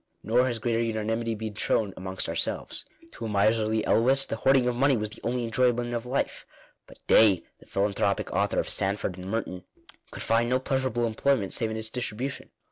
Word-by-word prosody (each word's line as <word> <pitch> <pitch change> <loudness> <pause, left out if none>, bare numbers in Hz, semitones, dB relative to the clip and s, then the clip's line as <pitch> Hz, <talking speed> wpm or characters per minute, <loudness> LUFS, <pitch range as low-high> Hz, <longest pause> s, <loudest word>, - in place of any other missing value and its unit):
Nor 125 +3 +3
has 120 -2 -1
greater 115 0 0
unanimity 115 0 -1
been 110 0 -5
shown 105 -1 0
amongst 95 0 -4
ourselves. - - -2 0.3
To 115 - -7
a - - -3
miserly 110 +2 +2
Elwes 135 +4 +4
the 110 - -4
hoarding 130 +1 +3
of 125 - 0
money 135 +1 +3
was 105 -1 -3
the - - -10
only 120 +1 -1
enjoyment 120 +1 +1
of 120 +1 -3
life; 135 +3 -2 0.4
but - - -15
Day, 100 -6 +5 0.2
the - - -19
philanthropic 100 0 0
author - - +1
of - - -1
"Sand 100 +2 +1
ford 90 - -3
and 90 +1 -7
Morton," 95 -4 -3 0.5
could - - -7
find 115 +1 +2
no 130 - +3
pleasurable 130 -3 -1
employment 115 -2 0
save 115 -2 +1
in 110 - -4
its 110 0 -5
distribution. 125 +2 -4
115 Hz, 195 wpm, -27 LUFS, 105-125 Hz, 0.5 s, Day